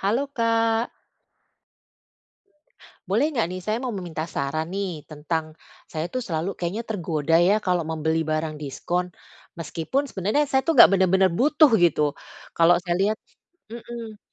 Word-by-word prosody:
Halo, 225 +8 +1
Kak. 230 0 +1 2.2
Boleh 305 - +1
nggak 240 - 0
nih, 185 - -5
saya 215 +4 -1
mau 250 -1 -4
meminta 175 -5 -4
saran 155 0 -3
nih, 190 -6 -4
tentang 155 +1 -4 0.3
saya 160 +1 -4
itu 255 - -2
selalu 185 -5 -3
kayaknya 180 +6 -3
tergoda 165 -6 -1
ya 195 +5 +4
kalau 180 -3 0
membeli 160 0 -1
barang 155 0 -2
diskon. 175 +5 -3 0.5
Meskipun 165 - -2
sebenarnya 210 +9 0
saya 265 -1 +2
itu - - +1
enggak 240 - +9
bener-bener 190 0 +3
butuh 300 - +4
gitu. 150 -4 +2 0.4
Kalau 170 +1 +6
saya 175 -1 -1
lihat 210 +3 +1 0.5
mhm, 230 -2 -8
180 Hz, 140 wpm, -24 LUFS, 160-225 Hz, 2.2 s, enggak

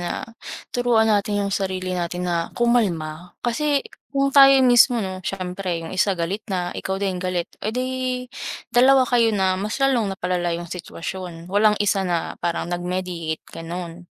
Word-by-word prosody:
na 175 - -2 0.6
turuan 240 -2 +3
natin 205 -1 +1
'yong 200 - -2
sarili 185 -1 -2
natin 175 0 -2
na 170 -1 -1
kumalma. 180 -9 0
Kasi 280 +4 +1 0.2
kung 275 0 0
tayo 275 -1 +9 0.2
mismo 245 0 +6
'no, 185 0 -5
siyempre 185 -1 -3
'yong 165 - -7
isa 190 +1 +1
galit 175 +5 -2
na, 180 -2 -2
ikaw 190 0 -3
din 190 -2 -2
galit, 180 -1 -1 0.2
eh, 215 - -2
di 255 0 -1 0.8
dalawa 260 +2 +6
kayo 230 -4 +2
na 190 -1 +2
mas 210 +1 -2
lalong 245 -8 +1
napalala 180 -1 -1
'yong 170 - -6
sitwasyon. 175 -1 -6
Walang 210 0 +4
isa 195 -2 +1
na 170 -2 -2
parang 170 0 -2
nag-mediate, 175 -2 -3
gano'n. 170 +1 -7
190 Hz, 155 wpm, -22 LUFS, 175-225 Hz, 0.8 s, tayo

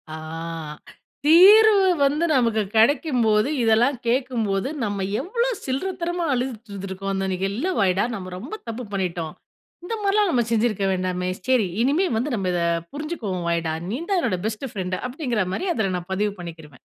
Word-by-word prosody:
ஆ - - -6 1.1
தீர்வு 395 +5 +7 0.2
வந்து 295 +4 +2
நமக்கு 230 -5 +2
கெடைக்கும்போது, 230 -2 +3
இதெல்லாம் 235 +4 +3
கேட்கும்போது 235 -4 0 0.2
நம்ம 205 -2 -2 0.2
எவ்வளோ 470 - -1 0.2
சில்லறத்தனமா 345 +5 -2
அழுதுட்டு 245 -3 -3
இருந்துருக்கோம். 195 0 -5
அந்த 195 0 -1
நீ 185 - -1
இல்ல 240 - -2
வாய்டா 190 0 +2
நம்ம 185 -2 -7
ரொம்ப 240 - -8
தப்பு 230 +2 -5
பண்ணிட்டோம். 175 -4 -2 0.5
இந்த 455 - -3
மாரிலாம் 405 0 +3
நம்ம 245 -5 +2
செஞ்சிருக்க 220 -3 +1
வேண்டாமே! 185 0 -2 0.2
சரி 250 -6 +3
இனிமே 290 +10 +2
வந்து 250 +6 -1
நம்ம 190 -4 -1
இத 175 - 0 0.3
புரிஞ்சுக்குவோம் 235 - -4
வாய்டா. 165 -1 0 0.2
நீ 225 - -2
தான் 390 - +2
என்னோட 210 - 0
பெஸ்ட் 220 +5 -4
ஃப்ரெண்ட் 185 -2 -3
அப்படிங்கிற 245 - -1
மாரி 375 - -2
அதில 195 - -1
நான் 175 +1 -9
பதிவு 205 +2 0
பண்ணிக்கிருவேன். 160 -6 -10
225 Hz, 150 wpm, -23 LUFS, 190-285 Hz, 1.1 s, தீர்வு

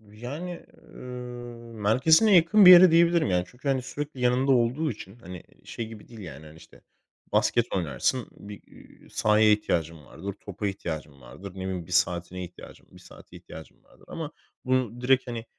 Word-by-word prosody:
Yani, 125 +12 -8 0.2
ııı, 120 -2 -10
merkezine 160 - +4
yakın 175 +4 +5
bir - - +12
yere 180 0 +9
diyebilirim 170 - +3
yani 90 -1 +1
çünkü 130 +3 -8
hani 135 -2 +1
sürekli 145 +1 -7
yanımda 125 +2 +2
olduğu 130 +6 +1
için 105 -2 -10
hani 90 -7 -10 0.2
şey 115 - -6
gibi 110 -1 -12
değil 115 -2 -12
yani 80 -4 -10
hani, 75 - -14
işte, - - -18 0.5
basket 120 -1 +2
oynarsın, 95 - -1
bir, 100 0 -12
iii, - - -19
sahaya 105 0 +3
ihtiyacın 85 -6 -2
vardır, 95 +9 -7
topa 100 +1 -6
ihtiyacın 80 -7 -6
vardır, 70 +11 -11
ne - - -18
bileyim 95 -3 -4
bir - - -11
saatine 90 +1 0
ihtiyacım, 90 0 -14
bir - - -15
saate - - -15
ihtiyacım 80 - -13
vardır. - - -23
Ama - - -6 0.3
bunu 125 -2 -1
direkt 130 +1 +2
hani 120 -2 -6
115 Hz, 170 wpm, -26 LUFS, 95-130 Hz, 0.5 s, bir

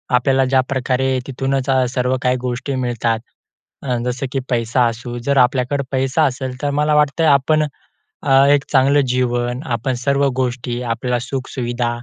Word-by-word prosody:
आपल्याला 135 +1 +2
ज्याप्रकारे 130 0 0
तिथूनच 135 0 -2 0.2
सर्व 125 0 0
काही 125 0 +2
गोष्टी 130 +2 -3
मिळतात 120 -3 -1 0.6
अ, 125 -3 -1
जसं 125 +2 -2
की 135 - -1
पैसा 120 +1 +1
असू 120 +1 -5
जर 140 0 +1
आपल्याकडं 130 +2 +2
पैसा 135 +3 +1
असेल, 130 0 -3
तर 145 - 0
मला 150 +1 +1
वाटतं 150 +2 +2
आपण 150 +2 +3 0.6
अ, 135 0 +5
एक 145 -1 +4
चांगलं 140 +1 +4
जीवन, 120 0 -1
आपण 125 0 -1
सर्व 140 0 +2
गोष्टी, 125 -1 -3
आपल्याला 120 +1 -1
सुख-सुविधा 125 -2 -3
130 Hz, 145 wpm, -19 LUFS, 125-135 Hz, 0.6 s, अ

